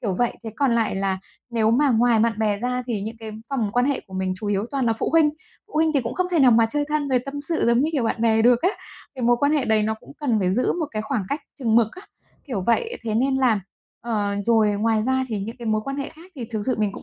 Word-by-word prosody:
kiểu 200 Hz, -5 st, -1 dB
vậy. 240 Hz, -1 st, +1 dB
Thế 225 Hz, -, -4 dB
còn 275 Hz, -4 st, +2 dB
lại 230 Hz, -2 st, +1 dB
là 195 Hz, -1 st, -1 dB, 0.3 s
nếu 225 Hz, -2 st, +2 dB
mà 275 Hz, +4 st, +3 dB
ngoài 235 Hz, -1 st, +3 dB
bạn 230 Hz, +1 st, +3 dB
bè 210 Hz, -2 st, +1 dB
ra 250 Hz, +2 st, -2 dB
thì 220 Hz, -5 st, -2 dB
những 220 Hz, +2 st, -5 dB
cái 220 Hz, -1 st, -7 dB, 0.2 s
vòng 235 Hz, -7 st, -1 dB
quan 245 Hz, +1 st, +2 dB
hệ 280 Hz, -1 st, 0 dB
của 190 Hz, -, -12 dB
mình 190 Hz, 0 st, -1 dB
chủ 210 Hz, -, -6 dB
yếu 205 Hz, 0 st, 0 dB
toàn 270 Hz, -3 st, -1 dB
là 225 Hz, -, +3 dB
phụ 225 Hz, -, -2 dB
huynh. 320 Hz, -2 st, +4 dB, 0.4 s
Phụ -, -, -20 dB
huynh 315 Hz, +1 st, +3 dB
thì 280 Hz, -, +4 dB
cũng 235 Hz, -1 st, -4 dB
không 365 Hz, -, 0 dB
thể 345 Hz, -, +2 dB
nào 265 Hz, -4 st, +6 dB
mà 225 Hz, -1 st, +5 dB
chơi 290 Hz, +6 st, -1 dB
thân 300 Hz, -1 st, -1 dB
rồi 260 Hz, -2 st, +3 dB
tâm 275 Hz, +1 st, -7 dB
sự 325 Hz, +3 st, -1 dB
giống 235 Hz, +1 st, +4 dB
như 295 Hz, -, +2 dB
kiểu 275 Hz, -6 st, 0 dB
bạn 225 Hz, 0 st, -1 dB
bè 225 Hz, -1 st, +3 dB
được 240 Hz, +2 st, +4 dB
á, 365 Hz, -, +4 dB, 0.4 s
cái 255 Hz, -, -6 dB
mối 240 Hz, +1 st, +4 dB
quan 285 Hz, +4 st, +2 dB
hệ 295 Hz, -4 st, +2 dB
đấy 220 Hz, -2 st, +2 dB
nó 220 Hz, +1 st, 0 dB
cũng -, -, -14 dB
cần 250 Hz, -7 st, +1 dB
phải 185 Hz, -2 st, +1 dB
giữ 250 Hz, +6 st, +1 dB
một 330 Hz, -3 st, -2 dB
cái 215 Hz, -1 st, -3 dB
khoảng 225 Hz, -1 st, -2 dB
cách 290 Hz, -, -2 dB, 0.2 s
chừng 230 Hz, -5 st, +1 dB
mực 230 Hz, -2 st, +4 dB
á, 370 Hz, -, -11 dB, 0.4 s
kiểu 245 Hz, -9 st, -2 dB
vậy. 455 Hz, -, +1 dB
Thế 220 Hz, -2 st, -2 dB
nên 265 Hz, +4 st, +2 dB
là 250 Hz, -6 st, +2 dB, 0.4 s
ờ, 210 Hz, -3 st, -1 dB
rồi 220 Hz, -2 st, +4 dB
ngoài 215 Hz, +1 st, +1 dB
ra 260 Hz, +2 st, +1 dB
thì 220 Hz, -3 st, -2 dB
những 225 Hz, +5 st, -6 dB
cái 235 Hz, -, -7 dB
mối 215 Hz, -1 st, +1 dB
quan 275 Hz, 0 st, -4 dB
hệ 280 Hz, -1 st, -3 dB
khác 330 Hz, +3 st, -16 dB
thì 250 Hz, -, -4 dB
thực 220 Hz, -2 st, -2 dB
sự 255 Hz, -, +2 dB
mình 210 Hz, -2 st, 0 dB
cũng -, -, -9 dB
235 Hz, 295 wpm, -23 LUFS, 220-275 Hz, 0.4 s, nào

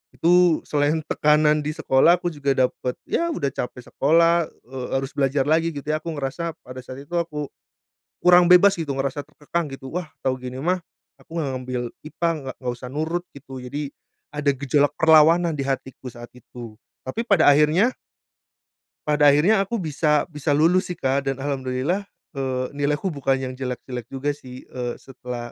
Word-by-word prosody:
Itu 175 Hz, -1 st, +4 dB
selain 150 Hz, +2 st, 0 dB
tekanan 150 Hz, 0 st, +3 dB
di 150 Hz, +1 st, -4 dB
sekolah, 135 Hz, +6 st, +4 dB
aku 175 Hz, 0 st, -3 dB
juga 140 Hz, -2 st, -1 dB
dapat 125 Hz, -1 st, 0 dB
ya 340 Hz, -, 0 dB
udah 140 Hz, -, -2 dB
capek 125 Hz, 0 st, -5 dB
sekolah, 165 Hz, +3 st, +3 dB, 0.2 s
eee, 130 Hz, 0 st, -6 dB
harus 135 Hz, 0 st, -4 dB
belajar 135 Hz, 0 st, +1 dB
lagi 160 Hz, +2 st, +2 dB
gitu 140 Hz, 0 st, -7 dB
ya. 155 Hz, -, 0 dB
Aku 170 Hz, -, -6 dB
ngerasa 155 Hz, +4 st, -3 dB
pada 130 Hz, +1 st, -8 dB
saat 130 Hz, +3 st, -9 dB
itu 175 Hz, -, -15 dB
aku 150 Hz, -3 st, -3 dB, 0.8 s
kurang 180 Hz, 0 st, +7 dB
bebas 185 Hz, +2 st, +7 dB
gitu, 145 Hz, -4 st, -3 dB
ngerasa 135 Hz, +1 st, -2 dB
terkekang 150 Hz, +2 st, -3 dB
gitu, 135 Hz, -1 st, -8 dB
"Wah, 180 Hz, -1 st, -3 dB, 0.2 s
tau 130 Hz, -, +2 dB
gini 125 Hz, 0 st, -7 dB
mah 180 Hz, +2 st, +1 dB, 0.4 s
aku 165 Hz, -, -13 dB
enggak 145 Hz, -4 st, -1 dB
ngambil 125 Hz, -1 st, -4 dB, 0.3 s
IPA, 170 Hz, +2 st, -1 dB
enggak 135 Hz, -4 st, -7 dB
enggak 125 Hz, -2 st, -3 dB
usah 125 Hz, -, -8 dB
nurut." 160 Hz, +5 st, -2 dB
Gitu, 135 Hz, -1 st, -12 dB
jadi 145 Hz, +4 st, -4 dB, 0.5 s
ada 150 Hz, -1 st, +1 dB
gejolak 140 Hz, +1 st, +1 dB
perlawanan 160 Hz, +2 st, +5 dB
di 140 Hz, -, -2 dB
hatiku 130 Hz, -1 st, -4 dB
saat 120 Hz, 0 st, -11 dB
itu, 120 Hz, -2 st, -11 dB, 0.3 s
tapi 175 Hz, -, -3 dB
pada 180 Hz, -8 st, +6 dB
akhirnya 155 Hz, -, +4 dB, 1.2 s
Pada 150 Hz, -1 st, +4 dB
akhirnya 155 Hz, +10 st, +5 dB
aku 195 Hz, +4 st, -1 dB
bisa 150 Hz, -1 st, +1 dB
bisa 150 Hz, 0 st, 0 dB
lulus 170 Hz, +5 st, +3 dB
sih, 180 Hz, -, -4 dB
Kak, 135 Hz, 0 st, -1 dB
dan 135 Hz, -, 0 dB
alhamdulillah, 135 Hz, +7 st, -2 dB, 0.2 s
eee, 130 Hz, -3 st, -2 dB
nilaiku 145 Hz, +5 st, -1 dB
bukan 135 Hz, -3 st, 0 dB
yang 130 Hz, -1 st, -4 dB
jelek-jelek 125 Hz, -2 st, -5 dB
juga 135 Hz, +3 st, -2 dB
sih, 130 Hz, -3 st, -11 dB
eee, 125 Hz, -1 st, -5 dB
setelah 125 Hz, -2 st, -8 dB
145 Hz, 170 wpm, -23 LUFS, 130-165 Hz, 1.2 s, kurang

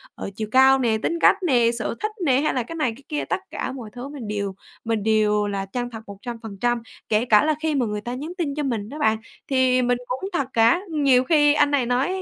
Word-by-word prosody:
ờ, -, -, -6 dB
chiều 215 Hz, -1 st, -4 dB
cao 265 Hz, +1 st, +6 dB
nè, 225 Hz, -3 st, +1 dB
tính 335 Hz, -, -1 dB
cách -, -, +6 dB
nè, 240 Hz, -7 st, +3 dB
sở 230 Hz, -1 st, -3 dB
thích 425 Hz, 0 st, -2 dB
nè, 265 Hz, -3 st, +4 dB
hay 305 Hz, -, +1 dB
là 255 Hz, -, 0 dB
cái 330 Hz, -, -8 dB
này, 280 Hz, -8 st, 0 dB
cái 275 Hz, -, -17 dB
kia, 300 Hz, -, -2 dB
tất -, -, -1 dB
cả -, -, -3 dB
mọi 250 Hz, -5 st, -8 dB
thứ 245 Hz, +2 st, -7 dB
mình 280 Hz, -6 st, -8 dB
đều 200 Hz, -2 st, -3 dB, 0.3 s
mình 225 Hz, -3 st, -1 dB
đều 210 Hz, -1 st, +2 dB
là 195 Hz, -1 st, -3 dB
chân 245 Hz, +5 st, -4 dB
thật 225 Hz, -2 st, -8 dB
100%. 230 Hz, +2 st, -3 dB, 0.3 s
Kể 215 Hz, +2 st, +2 dB
cả 215 Hz, -1 st, +5 dB
là 310 Hz, -1 st, +2 dB
khi 315 Hz, -2 st, 0 dB
mà 255 Hz, -4 st, +1 dB
người 210 Hz, -1 st, -3 dB
ta 240 Hz, +3 st, -5 dB
nhắn 295 Hz, +7 st, -5 dB
tin 295 Hz, -5 st, -2 dB
cho 300 Hz, -, -2 dB
mình 225 Hz, -6 st, -2 dB
đó 300 Hz, +4 st, -8 dB
bạn, 220 Hz, -5 st, +2 dB, 0.3 s
thì 260 Hz, -1 st, +3 dB
mình 245 Hz, 0 st, +1 dB
cũng 260 Hz, +10 st, -4 dB
thật 275 Hz, -3 st, 0 dB
cả. 230 Hz, +10 st, +4 dB
Nhiều 275 Hz, -4 st, +3 dB
khi 295 Hz, 0 st, +4 dB
anh 290 Hz, -1 st, +3 dB
này 275 Hz, -4 st, +2 dB
nói 250 Hz, +3 st, +1 dB
245 Hz, 250 wpm, -23 LUFS, 220-280 Hz, 0.3 s, cao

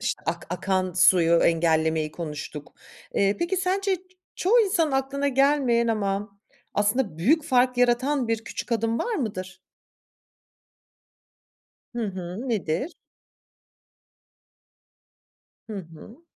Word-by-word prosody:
işte, -, -, -2 dB
ak -, -, -3 dB
akan 185 Hz, 0 st, -1 dB
suyu 180 Hz, -2 st, +5 dB
engellemeyi 160 Hz, -2 st, +2 dB
konuştuk. 150 Hz, -2 st, -7 dB, 0.4 s
Eee, 200 Hz, +1 st, +2 dB
peki 345 Hz, +3 st, -1 dB
sence 380 Hz, +1 st, 0 dB
ç -, -, -19 dB, 0.4 s
çoğu 460 Hz, +6 st, +4 dB
insanın 340 Hz, -8 st, +1 dB
aklına 275 Hz, +1 st, 0 dB
gelmeyen 270 Hz, -3 st, +3 dB
ama 200 Hz, -1 st, -2 dB, 0.4 s
aslında 205 Hz, -4 st, 0 dB
büyük 295 Hz, -, +3 dB
fark 250 Hz, -3 st, +2 dB
yaratan 250 Hz, +1 st, +2 dB
bir 225 Hz, -1 st, -1 dB
küçük 240 Hz, -, -5 dB
adım 230 Hz, 0 st, 0 dB
var 475 Hz, -, -1 dB
mıdır? 190 Hz, -, -4 dB, 2.4 s
Hı 235 Hz, -2 st, -1 dB
hı, 190 Hz, +6 st, -6 dB
nedir? 210 Hz, -, -1 dB, 2.8 s
Hı -, -, -5 dB
hı. 190 Hz, -, -14 dB
225 Hz, 105 wpm, -25 LUFS, 185-275 Hz, 2.8 s, suyu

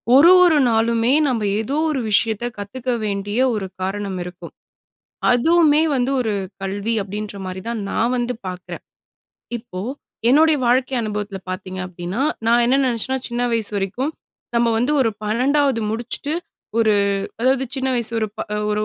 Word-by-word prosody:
ஒரு 315 Hz, +6 st, +8 dB
ஒரு 330 Hz, -4 st, +5 dB
நாளுமே 230 Hz, +2 st, +2 dB
நம்ப 240 Hz, -5 st, 0 dB, 0.2 s
ஏதோ 265 Hz, +7 st, -2 dB
ஒரு 270 Hz, -4 st, -1 dB
விஷயத்தை 220 Hz, +2 st, +1 dB
கத்துக்க 245 Hz, +5 st, -5 dB, 0.2 s
வேண்டிய 205 Hz, +2 st, -2 dB, 0.2 s
ஒரு 195 Hz, -3 st, -3 dB
காரணம் 195 Hz, 0 st, -3 dB
இருக்கும். 180 Hz, 0 st, -10 dB, 0.8 s
அதுவுமே 310 Hz, +4 st, +4 dB
வந்து 250 Hz, +1 st, +1 dB
ஒரு 225 Hz, -3 st, 0 dB, 0.3 s
கல்வி 200 Hz, +4 st, -2 dB
அப்படின்ற 205 Hz, +1 st, -6 dB
மாரி 185 Hz, 0 st, -5 dB
தான் 235 Hz, -1 st, -2 dB
நான் 235 Hz, +3 st, +1 dB
வந்து 245 Hz, 0 st, -1 dB
பார்க்குறேன். 180 Hz, 0 st, -7 dB, 0.8 s
இப்போ 225 Hz, -5 st, -9 dB, 0.5 s
என்னுடைய 310 Hz, +3 st, +5 dB
வாழ்க்கை 260 Hz, +2 st, +2 dB
அனுபவத்தில 210 Hz, -2 st, -3 dB
பார்த்திங்க 185 Hz, 0 st, -5 dB
அப்படின்னா, 180 Hz, +5 st, -4 dB, 0.2 s
நான் 235 Hz, +1 st, +4 dB
என்ன 255 Hz, +3 st, +3 dB
நினைச்சேன்னா 255 Hz, +2 st, -1 dB
சின்ன 240 Hz, +1 st, -2 dB
வயசு 225 Hz, -2 st, 0 dB
வரைக்கும், 210 Hz, +10 st, -2 dB, 0.4 s
நம்ம 235 Hz, 0 st, +3 dB
வந்து 245 Hz, +6 st, +1 dB
ஒரு 235 Hz, -, +3 dB
12வது 255 Hz, +3 st, +2 dB
முடிச்சுட்டு, 240 Hz, +6 st, -3 dB, 0.5 s
ஒரு 220 Hz, -2 st, +4 dB, 0.5 s
அதாவது 260 Hz, +2 st, +2 dB
சின்ன 265 Hz, 0 st, -1 dB
வயசு 235 Hz, -2 st, 0 dB
ஒரு 220 Hz, -, 0 dB, 0.4 s
ஒரு 210 Hz, 0 st, 0 dB
230 Hz, 145 wpm, -21 LUFS, 205-260 Hz, 0.8 s, ஒரு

